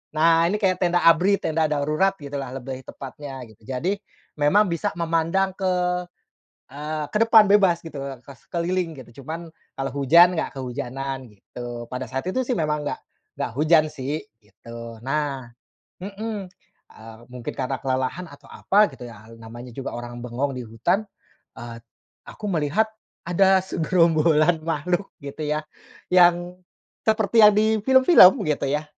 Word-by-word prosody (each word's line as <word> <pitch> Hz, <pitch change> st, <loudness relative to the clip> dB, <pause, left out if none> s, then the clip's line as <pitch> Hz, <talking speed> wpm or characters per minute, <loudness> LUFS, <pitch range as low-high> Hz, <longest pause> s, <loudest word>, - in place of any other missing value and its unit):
Nah, 165 Hz, +1 st, +4 dB
ini 210 Hz, -, 0 dB
kayak 185 Hz, -2 st, +1 dB
tenda 175 Hz, 0 st, +2 dB
ABRI, 175 Hz, +5 st, +5 dB
tenda 160 Hz, 0 st, 0 dB
darurat, 155 Hz, +7 st, +1 dB
gitulah, 140 Hz, -2 st, -6 dB
lebih 130 Hz, 0 st, -6 dB
tepatnya, 135 Hz, 0 st, -9 dB
gitu. 110 Hz, 0 st, -20 dB
Jadi, 165 Hz, +10 st, -1 dB, 0.4 s
memang 195 Hz, +8 st, +4 dB
bisa 170 Hz, -, -1 dB
memandang 170 Hz, +3 st, 0 dB
ke, 185 Hz, -2 st, 0 dB, 0.9 s
eee, 150 Hz, +2 st, -4 dB
ke -, -, -3 dB
depan 220 Hz, -3 st, +7 dB
bebas, 190 Hz, -5 st, +4 dB
gitu, 160 Hz, -3 st, -9 dB, 0.3 s
ke 140 Hz, -, -11 dB
sekeliling, 170 Hz, +2 st, -3 dB
gitu. 125 Hz, +2 st, -12 dB
Cuman, 165 Hz, +3 st, -6 dB, 0.3 s
kalau 135 Hz, 0 st, -3 dB
hujan, 170 Hz, +6 st, +5 dB
nggak 160 Hz, -, -3 dB
kehujanan, 130 Hz, 0 st, -5 dB
gitu. 120 Hz, +3 st, -9 dB
Pada 125 Hz, 0 st, -4 dB
saat 135 Hz, +3 st, -3 dB
itu, 255 Hz, +7 st, -1 dB
sih, 250 Hz, -, -1 dB
memang 150 Hz, -2 st, -1 dB
nggak -, -, -5 dB, 0.4 s
nggak -, -, -3 dB
hujan 155 Hz, +1 st, +5 dB
sih, 145 Hz, +1 st, -4 dB, 0.2 s
gitu. 115 Hz, +2 st, -11 dB
Nah, 135 Hz, -2 st, -3 dB, 0.5 s
mhm. 205 Hz, 0 st, -5 dB, 0.4 s
Eee, 110 Hz, 0 st, -13 dB
mungkin 125 Hz, -1 st, -6 dB
karena 135 Hz, 0 st, -2 dB
kelelahan 130 Hz, +7 st, -2 dB
atau -, -, -16 dB
apa, 210 Hz, +2 st, +3 dB
gitu 125 Hz, -, -10 dB
ya, 110 Hz, -2 st, -13 dB
al 115 Hz, -, -13 dB
namanya 120 Hz, +2 st, -10 dB
juga 135 Hz, -, -5 dB
orang 120 Hz, 0 st, -7 dB
bengong 130 Hz, +3 st, -2 dB
di 125 Hz, -, -5 dB
hutan, 175 Hz, -, 0 dB, 0.5 s
eee, 115 Hz, 0 st, -8 dB, 0.5 s
aku 210 Hz, -, -8 dB
melihat 170 Hz, +7 st, +1 dB, 0.4 s
ada 190 Hz, +2 st, +4 dB
segerombolan 165 Hz, -2 st, +2 dB
makhluk, 175 Hz, +5 st, -1 dB
gitu 140 Hz, +2 st, -7 dB
ya, 150 Hz, +1 st, -1 dB, 0.5 s
yang 175 Hz, 0 st, +4 dB, 0.5 s
seperti 220 Hz, +1 st, +3 dB
yang 210 Hz, -, +9 dB
di 220 Hz, +1 st, +2 dB
film-film, 260 Hz, -, +7 dB
gitu 150 Hz, -2 st, -1 dB
ya. 150 Hz, +1 st, -1 dB
155 Hz, 150 wpm, -23 LUFS, 130-180 Hz, 0.9 s, yang